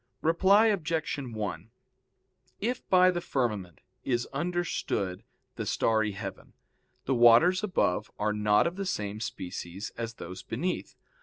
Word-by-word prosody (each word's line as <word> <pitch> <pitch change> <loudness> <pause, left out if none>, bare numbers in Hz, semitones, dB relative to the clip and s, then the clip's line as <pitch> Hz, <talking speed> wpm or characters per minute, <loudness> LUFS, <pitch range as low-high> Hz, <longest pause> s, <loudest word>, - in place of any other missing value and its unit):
Reply 190 +6 +5
Obj. 165 -8 0
1: 110 - -5 0.9
If 240 +4 -3
by 185 0 +6
the 175 -1 -3
firmament 105 - -2 0.2
is 120 -2 0
understood 150 - -2 0.4
the - - -3
starry 110 -2 +1
heaven, 95 -1 -8 0.5
the 135 - +1
waters 125 - +6
above 105 - 0
are 105 0 0
not 105 0 +3
of 170 +2 -2
the 195 - -2
same 105 - -3
species 90 -2 -6
as 115 0 -4
those 95 -1 -8
beneath. 175 +11 -3
120 Hz, 130 wpm, -29 LUFS, -, 0.9 s, by